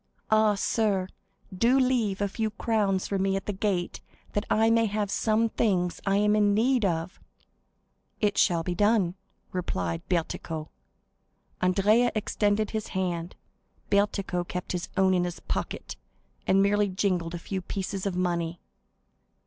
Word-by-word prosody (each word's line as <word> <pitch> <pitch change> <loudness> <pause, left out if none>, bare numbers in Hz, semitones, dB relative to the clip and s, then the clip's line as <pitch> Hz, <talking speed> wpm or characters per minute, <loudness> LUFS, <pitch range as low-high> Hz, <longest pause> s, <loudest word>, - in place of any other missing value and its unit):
Ah, 215 -1 +4
sir, 200 -2 0 0.5
do 235 +7 +3
leave 235 -7 +1
a 200 - +2
few 220 +2 -2
crowns 205 -3 0
for 195 - -1
me 195 0 +1
at 195 - -3
the 205 - -2
gate 190 -3 -2 0.3
that 205 +1 -1
I 225 +1 +3
may 230 0 +3
have 205 -1 -2
some 220 +1 +2
things 180 -6 0
I 195 0 +3
am 210 +1 +3
in 205 -1 +3
need 245 +2 +2
of!" 170 -1 -1 1.0
"It 210 -2 +1
shall 170 -2 +3
be 180 - -2
done," 205 -2 +2 0.4
replied 90 - -2
Bertuccio. 160 -2 -2 0.9
Andrea 210 +6 +3
extended 210 0 0
his 220 -1 -3
hand; 175 -2 -2 0.6
Bertuccio 200 -3 +1
kept 180 +1 -5
his 180 -1 -3
own 190 -1 +4
in 180 -1 +2
his 175 0 -4
pocket, - - -4 0.5
and 195 +1 +4
merely 205 +1 +3
jingled 185 -3 -1
a - - -3
few 190 +2 -4
pieces 195 +1 -4
of 190 - -2
money. 170 -2 -1
195 Hz, 150 wpm, -27 LUFS, 180-215 Hz, 1.0 s, Ah